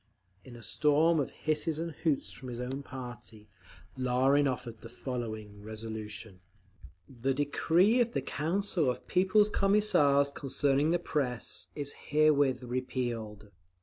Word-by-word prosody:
In 120 +1 -12
a 120 - -11
storm 155 +5 +3
of 140 - -1
hisses 155 0 -1
and 165 +1 -3
hoots 150 -2 -1
from 130 - -9
his 120 -1 -6
own 130 +3 -4
party, 120 -5 -9 0.5
Larin 130 +3 +3
offered 120 -4 -4
the 115 - -10
following 110 -5 -6
resolution: 110 -2 -7 0.7
The 130 +1 -2
decree 170 - +3
of 235 0 0
the - - 0
Council 165 -1 0
of 125 - -4
People's 190 +3 +3
Commissars 150 -10 +3
concerning 140 +1 +1
the 175 - +3
Press 135 -8 -2
is 145 -1 -4 0.2
herewith 145 -3 +3
repealed. 120 -4 -4
135 Hz, 130 wpm, -30 LUFS, 120-155 Hz, 0.7 s, storm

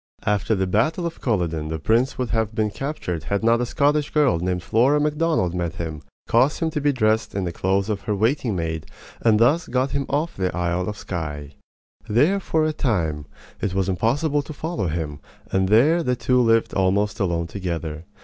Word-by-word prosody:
After 105 +1 +1
the 95 -1 0
battle 120 - +1
of 170 - -5
Culloden 85 - -1
the 80 +1 -3
prince 115 - +1
would 125 -2 -2
have 110 -2 0
been 110 -2 0
captured 105 - -4
had 100 +2 -1
not 115 +1 +3
a 125 - -1
Scottish 145 +3 +1
girl 145 - +2
named 90 0 -2
Flora 130 +9 +3
Macdonald 150 - +1
met 85 -2 -2
him, 80 -3 -5 0.3
caused 130 +6 +3
him 160 -1 0
to 150 - -2
be 145 0 +3
dressed 110 -5 +1
in 100 - -1
the 90 - -2
clothes 95 +3 0
of 105 -2 -2
her 105 - 0
waiting 115 +1 +1
maid, 80 -2 -3 0.3
and 110 -2 +4
thus 150 +9 +3
got 130 +2 0
him 140 -1 -2
off 150 +4 -1
to - - -7
the 90 -2 -1
Isle 90 +1 -1
of 105 - -6
Skye. 75 -7 -5 0.6
There 145 - +3
for 160 -4 0
a 155 - 0
time 80 - -1 0.3
it 95 -2 -2
was 95 -1 +1
impossible 140 - +1
to 155 - -9
follow 150 - -3
him; 75 -3 -3 0.3
and 95 0 +1
there 145 +11 +5
the 125 -6 0
two 125 +1 +2
lived 115 -1 +2
almost 100 +2 +1
alone 85 -3 0
together. 85 -3 -5
105 Hz, 200 wpm, -23 LUFS, 90-140 Hz, 0.6 s, there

